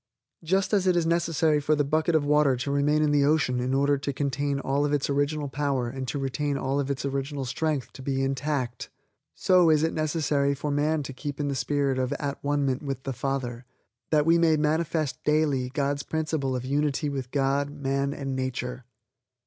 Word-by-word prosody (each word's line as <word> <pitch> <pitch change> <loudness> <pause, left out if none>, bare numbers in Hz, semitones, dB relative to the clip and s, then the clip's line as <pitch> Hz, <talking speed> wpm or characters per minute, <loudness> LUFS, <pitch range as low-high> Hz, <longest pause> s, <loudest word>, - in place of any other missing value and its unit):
Just 190 +5 +1
as 195 -2 +3
it 180 - +4
is 170 -2 +2
necessary 165 -2 +2
for 155 +2 +2
the 145 - +2
bucket 155 +3 +1
of 150 -2 +2
water 150 -2 +4
to 125 +3 -3
remain 145 +2 +2
in 150 - +2
the 145 -1 +3
ocean 140 -4 +2
in 130 +2 0
order 140 0 +2
to 140 - -2
contain 140 0 -1
all 140 +1 0
of 145 0 0
its 145 0 0
original 145 +1 0
power 135 -3 -1
and 130 +1 -5
to 145 - -3
retain 140 +1 -1
all 135 +1 -1
of 140 -1 -2
its 140 0 -2
original 140 0 -3
strength, 140 +2 -2
to - - -10
be 135 0 -1
intact, 135 -3 -2 0.5
so 180 -3 +4
is 155 -1 +4
it 160 - +1
necessary 145 -3 0
for 145 +1 -3
man 150 +1 +1
to 135 - -7
keep 145 +2 -6
in 145 -1 -1
the - - -1
spirit 140 -1 0
of 130 +2 0
at 140 -1 -4
one 145 0 +1
ment 130 -1 -1
with 135 -3 -4
the 135 - -3
Father, 125 -2 -3 0.4
that 150 -2 +3
we 165 +1 +4
may 160 -2 +4
manifest 155 0 0
daily 150 -4 +1
God's 140 +1 -1
principle 155 -4 -2
of 125 0 -4
Unity 145 +2 0
with 135 -3 -4
God, 140 +1 0
man 140 -1 -1
and 135 -2 -4
nature. 125 -1 -4
140 Hz, 205 wpm, -26 LUFS, 135-150 Hz, 0.5 s, it